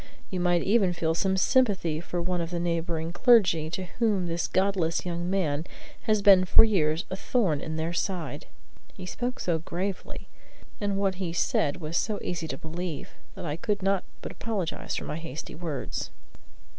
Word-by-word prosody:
You 185 - -2
might 175 -1 +2
even 195 -3 +3
feel 160 -2 0
some 190 +3 +1
sympathy 190 -9 +2
for 175 0 -3
one 180 0 0
of 165 - -3
the 175 -1 -2
neighboring 170 -1 -1
clergy, 185 -10 +4
to 185 +3 -3 0.2
whom 210 -6 +2
this 170 0 -1
godless 185 -4 +1
young 175 0 -2
man 165 -5 0 0.4
has 215 -2 +2
been 195 -2 +8
for 185 - +7
years 170 -5 +2
as 190 - -3
a - - -13
thorn 185 - +1
in 160 - -4
their 160 +2 -2
side." 175 -6 -3 0.5
He 185 - -8
spoke 245 +7 -3
so 170 -2 0
gravely, 180 +4 -4 0.5
and 200 -1 0
what 195 -1 0
he 170 -3 -2
said 160 -2 +1
was 165 -1 -3
so 215 -2 0
easy 170 -2 -3
to - - -4
believe, 170 -2 -5 0.3
that - - -6
I 150 -2 -2
could 205 +3 -2
not 195 -1 +2 0.2
but - - -5
apologize 205 -7 -3
for - - -3
my 150 - -4
hasty 160 -3 -6
words. 155 -5 -4
175 Hz, 180 wpm, -27 LUFS, 165-195 Hz, 0.5 s, been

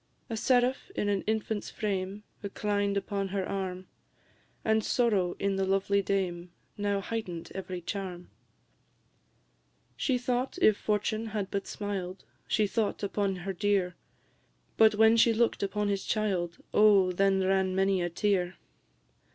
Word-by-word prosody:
A - - -1
seraph 250 +5 +2
in 205 - 0
an 200 -2 +1
infant's 220 -1 -1
frame 200 -1 -3 0.2
Reclined 205 0 -1
upon 200 0 -2
her 190 -1 -2
arm; 185 -1 -3 0.8
And 220 0 +3
sorrow 205 -9 +1
in 200 -1 0
the 195 - +1
lovely 195 +1 +2
dame 185 -3 -2 0.3
Now 205 -1 0
heighten'd 190 -6 -5
every 185 -2 -5
charm: 180 -1 -5 1.6
She 260 -3 +1
thought, 250 +4 -1
if 215 - +5
fortune 215 +2 -1
had 210 -3 -3
but 200 0 -2
smiled 195 -3 -4 0.2
She 215 - +2
thought 210 0 -1
upon 200 -1 0
her 195 - -2
dear; 195 -2 +1 0.8
But 220 -1 +6
when 220 +1 +6
she 230 0 +5
look'd 235 +1 +1
upon 205 +1 -1
his 200 -1 -1
child, 190 -6 -1 0.2
Oh, 200 -3 +6
then 195 +1 +2
ran 190 0 +1
many 195 -1 +2
a 175 - 0
tear! 180 0 0
200 Hz, 140 wpm, -29 LUFS, 190-215 Hz, 1.6 s, But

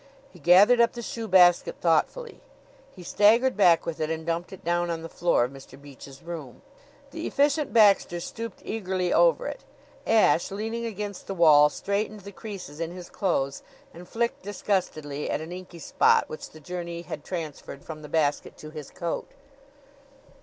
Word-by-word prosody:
He 180 - -15
gathered 195 - +6
up 235 - +3
the 235 - -7
shoe 225 0 -5
basket 180 -3 +5
thoughtfully. 180 - 0 0.5
He 180 - -11
staggered 225 +7 +3
back 175 -5 +4
with 165 - -4
it 155 -1 -1
and 160 0 -4
dumped 170 +1 -3
it 190 - -11
down 175 +1 0
on 165 -1 -3
the - - -5
floor 175 -8 +1
of 125 - -3
Mr. 135 -1 -13
Beach's 140 -1 -13
room. 160 -7 -8 0.5
The 325 +3 -5
Efficient 290 +1 +1
Baxter 205 -6 +4
stooped 230 +5 -7
eagerly 185 -4 -2
over - - +3
it. - - -6 0.4
Ashe, 220 -6 +3
leaning 225 +4 -4
against 205 -2 -6
the 195 - -4
wall, 150 -4 +6
straightened 205 +5 -3
the 200 +1 -10
creases 190 -8 -9
in 165 -1 -2
his 175 0 -10
clothes 140 -8 -1 0.3
and 175 +1 -12
flicked 235 +1 -2
disgustedly 180 -8 -3
at - - -1
an 160 +2 -8
inky 180 -1 -9
spot 165 - +2
which 155 - -8
the 155 - -14
journey 170 +1 -6
had 150 - -7
transferred 155 -5 -7
from 155 -1 -8
the 150 - -10
basket 150 -3 -1
to 155 - -10
his 150 -3 -8
coat. 170 -1 -4
175 Hz, 175 wpm, -26 LUFS, 160-210 Hz, 0.5 s, gathered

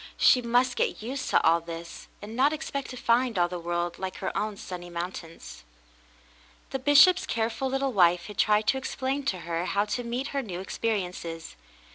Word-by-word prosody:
She 250 - +5
must 245 +1 +2
get - - -1
used 260 +3 -4
to - - +5
all 165 +1 +5
this, 165 0 -8 0.2
and 215 +2 -7
not 275 +5 +3
expect 280 -3 -4
to 255 - -7
find 235 -1 +2
all 175 -1 +3
the 180 0 -5
world 175 0 -2
like 190 -1 -4
her 190 - -4
own 210 -1 -2
sunny 175 -2 -7
mountains. 170 - -7 1.1
The 270 - -2
bishop's 290 +7 +6
careful 230 +3 -1
little 270 0 -1
wife 175 -3 +4
had 210 -2 -10
tried 210 0 +3
to 265 - +2
explain 265 +1 -3
to 185 -9 -1
her 170 +1 -2
how 200 +2 +1
to 245 +4 -3
meet 245 +4 -3
her 280 - -1
new 185 -8 -6
experiences. 180 -5 -3
215 Hz, 185 wpm, -27 LUFS, 175-260 Hz, 1.1 s, bishop's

